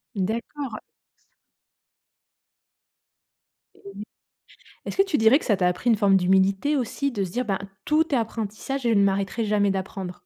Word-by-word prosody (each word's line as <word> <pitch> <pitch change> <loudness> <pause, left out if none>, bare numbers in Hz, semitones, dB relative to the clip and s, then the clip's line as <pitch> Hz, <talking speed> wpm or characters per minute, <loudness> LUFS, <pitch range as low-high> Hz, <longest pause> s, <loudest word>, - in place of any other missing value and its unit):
D'accord. 230 +5 -4 3.0
Et 200 +1 -10 0.8
est-ce - - -5
que 390 - +5
tu 385 -7 -1
dirais 225 +6 +5
que - - -11
ça 210 -5 +2
t'a 180 - +1
appris 235 +7 -1
une 220 - +4
forme 195 -1 +4
d'humilité 195 +9 +2
aussi, 270 +3 -2
de 200 -4 -2
se 180 - -6
dire, 250 +1 -1
ben: 195 -3 -1 0.3
«Tout 305 -1 +1
est - - +3
apprentissage 225 +3 -3
et - - +3
je - - +3
ne 200 - +4
m'arrêterai 200 +3 -1
jamais 205 -1 +1
d'apprendre»? 190 -1 -4
210 Hz, 160 wpm, -24 LUFS, 195-250 Hz, 3.0 s, que